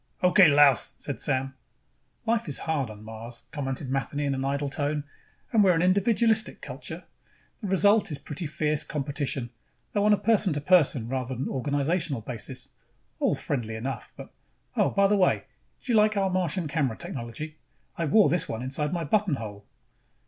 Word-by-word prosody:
"Okay, 180 0 +7
louse," 145 -3 +5
said 145 - -5
Sam. 135 -1 0 0.7
"Life 230 -2 +1
is 145 - -2
hard 150 -7 0
on 105 0 -10
Mars," 110 +2 -8
commented 135 -2 -4
Matheny 145 +2 -1
in 140 - 0
an 135 0 -2
idle 140 +1 -1
tone, 145 +1 -2 0.5
"and 215 -2 +6
we're 185 -3 +5
an 165 - +1
individualistic 220 +4 +2
culture. - - -7 0.6
The 205 - -3
result 200 +3 +4
is 150 - -4
pretty 150 +4 -4
fierce 150 0 0
competition, 140 -3 -3 0.4
though 205 - +2
on 210 - +4
a 210 - +5
person 210 -5 +2
to 145 - -1
person 150 -8 +3
rather 130 0 -3
than 125 - -3
organizational 145 +1 -1
basis. 115 -1 -6 0.5
All - - +2
friendly 115 -5 -3
enough, 130 +4 -5
but - - -10 0.4
Oh, - - +3
by 200 - +3
the 205 +1 +4
way, 185 - +4
how - - -24
do 255 - -1
you - - +3
like 215 0 +4
our 195 -1 +1
Martian 180 -2 0
camera 140 -6 -1
technology? 155 -1 -6 0.4
I 170 - -1
wore 200 +6 +5
this 175 +4 +1
one 115 +2 -3
inside 145 +3 -2
my 175 -2 -1
buttonhole." 135 - -1
150 Hz, 175 wpm, -27 LUFS, 135-185 Hz, 0.7 s, Okay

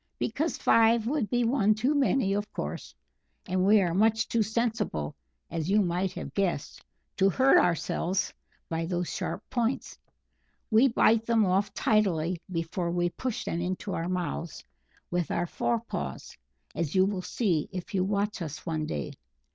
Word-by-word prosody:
Because 295 +9 -1
five 230 0 +4
would 255 -3 0
be 245 -1 +1
one 225 -3 +3
too 250 +7 +1
many, 270 -7 +2
of 205 +1 -2
course!), - - -5 0.5
and 185 0 +1
we 205 +2 +6
are 175 -3 0
much 220 +3 +3
too 230 - +1
sensible, 220 - -1 0.4
as 165 0 -2
you 205 +2 +4
might 180 -1 0
have - - -7
guessed, 185 -7 -2 0.3
to 195 - +4
hurt 260 +7 +5
ourselves 180 +2 0 0.3
by 165 0 -2
those 175 -1 -2
sharp - - -4
points. 240 +1 -1 0.7
We 225 +5 +6
bite 225 -2 +3
them 225 -2 +4
off 195 +2 +1
tidily 185 - +1
before 170 +1 -2
we 175 0 +1
push 255 +2 -3
them 170 - -2
into 185 +3 -3
our 165 +2 -2
mouths 175 -2 -3 0.5
with 175 -1 0
our 175 - 0
fore 230 +6 -1
paws, 235 - -6 0.4
as 165 -1 -2
you 185 0 +5
will 195 -2 -2
see 180 -6 0
if 185 0 -6
you 185 -2 +2
watch 200 +1 -1
us 155 -2 -6
one 155 -2 -2
day. 70 -2 -4
195 Hz, 165 wpm, -28 LUFS, 175-225 Hz, 0.7 s, we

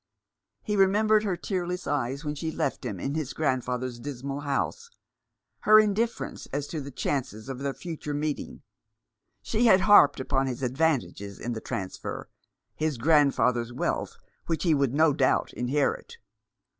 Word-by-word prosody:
He 210 - -1
remembered 210 +2 +4
her 185 -4 -1
tearless 180 -1 -3
eyes 140 +1 -2
when 150 - -1
she 160 +2 -4
left 140 - -2
him 105 -7 -4
in 135 +9 -3
his 155 -3 -3
grandfather's 125 -4 -1
dismal 140 +2 -5
house, 145 - -2 0.7
her 215 0 +7
indifference 215 +2 -1
as 140 +1 -3
to 155 - -4
the 140 - -7
chances 125 -5 -3
of 135 -2 -5
their 140 0 -3
future 160 -4 -5
meeting. 150 0 -4 0.8
She 235 +2 +2
had 190 -3 +6
harped 190 -8 +6
upon 135 0 0
his 130 +1 -4
advantages 125 - -1
in 120 +2 -4
the 110 - -5
transfer, 95 -1 -5 0.4
his 155 -3 -2
grandfather's 125 -4 +3
wealth, 120 - -2 0.3
which 160 -3 -1
he 170 -4 +3
would 140 -3 +1
no 155 0 +4
doubt 135 -2 +1
inherit. 140 - -1
145 Hz, 150 wpm, -27 LUFS, 130-170 Hz, 0.8 s, her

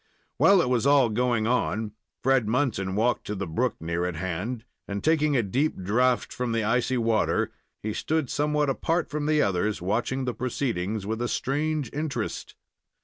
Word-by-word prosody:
While 195 -3 +6
it - - -1
was 125 +1 +2
all 140 -4 +5
going 120 0 +1
on, 110 -3 0 0.3
Fred 130 -4 +3
Munson 110 -6 0
walked 115 +4 +1
to 105 - -2
the 100 0 -3
brook 120 +10 0
near 85 +2 -2
at 90 - -4
hand, 95 +8 -3 0.2
and 100 0 -4
taking 155 -3 +3
a 120 - +2
deep 130 +10 0
draught 125 +6 +1
from 125 -2 -2
the 115 -1 +1
icy 125 +3 +1
water, 115 -2 +1 0.3
he 110 0 -2
stood 155 +2 -1
somewhat 150 +2 +1
apart 165 +5 0
from 150 0 -2
the 155 -1 +3
others, 100 +2 0
watching 120 +8 -1
the 125 - -1
proceedings 110 -6 -2
with 110 +2 -3
a 120 - 0
strange 145 +1 -1
interest. 150 -1 -3
120 Hz, 175 wpm, -26 LUFS, 105-140 Hz, 0.3 s, While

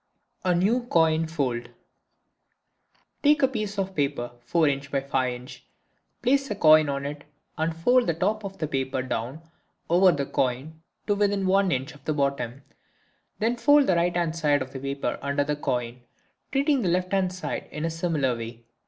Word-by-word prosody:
A 180 -1 +2
New 230 +8 +1
Coin 160 -4 +3
Fold.—Take 150 - -4
a - - +7
piece 215 -5 -4
of 195 -1 -2
paper 140 -4 -1
4 165 -2 +2
in. 140 -1 0
by 140 - +1
5 135 -2 0
in., 125 +1 -11 0.8
place 275 +2 +2
a 210 - -2
coin 155 -4 +6
on 140 0 -2
it 145 0 -6 0.3
and 160 +1 -1
fold 245 +9 +3
the 170 - +1
top 210 +6 0
of 195 -1 -7
the 155 - -2
paper 130 -2 -2
down 130 +5 -4 0.5
over 180 +2 +6
the 140 -3 -1
coin 135 +6 -2 0.2
to 205 - +2
within 200 -1 +1
1 195 0 +3
in. 130 -5 +1
of 145 - -18
the 155 - 0
bottom. 140 -2 -2 0.7
Then 225 +5 0
fold 290 +4 +5
the 185 - +2
right 170 +1 +1
hand 165 -2 0
side 145 -4 +2
of 130 - -13
the 135 - -5
paper 140 +1 -3
under 140 +1 0
the 150 +1 -1
coin, 125 -4 -3 0.5
treating 275 0 +2
the 185 - 0
left 180 +1 0
hand 190 -2 +1
side 180 0 -5
in 155 +1 -4
a 165 - -1
similar 160 -6 0
way. 115 0 -8
160 Hz, 180 wpm, -26 LUFS, 140-195 Hz, 0.8 s, a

